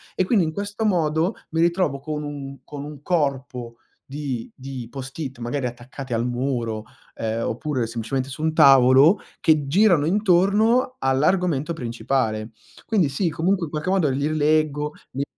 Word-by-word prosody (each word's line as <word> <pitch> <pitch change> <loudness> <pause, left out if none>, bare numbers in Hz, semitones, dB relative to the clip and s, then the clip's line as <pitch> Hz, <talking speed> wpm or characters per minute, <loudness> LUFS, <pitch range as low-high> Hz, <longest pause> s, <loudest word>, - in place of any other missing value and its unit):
e - - +2
quindi 200 -1 +3
in 160 - -2
questo 205 +4 -4
modo 165 -1 +1 0.2
mi 160 0 0
ritrovo 170 -5 +1
con 150 +1 -4
un 140 -2 -7
con 145 -1 -7
un 150 -2 -9
corpo 135 -7 -2 0.3
di 135 -4 -5
di 130 -3 -7
post-it, 135 0 -7
magari 125 +3 -3
attaccati 125 +2 -6
al 115 +1 0
muro, 120 -3 -2 0.3
ehm, 115 +1 -2
oppure 130 +1 -2
semplicemente 120 +4 -3
su 150 +3 -7
un 160 0 +1
tavolo, 135 +6 +6 0.2
che 155 -3 +3
girano 175 -1 +4
intorno 210 +7 +3
all'argomento 155 +3 +1
principale. 115 -4 -2 0.3
Quindi 195 -10 +2
sì, 165 +6 0
comunque 175 +3 0
in 150 - -10
qualche 155 +3 -3
modo 185 -6 +2
li 140 +2 0
rileggo, 150 -1 +1 0.2
mi 135 - -2
145 Hz, 150 wpm, -23 LUFS, 130-165 Hz, 0.3 s, tavolo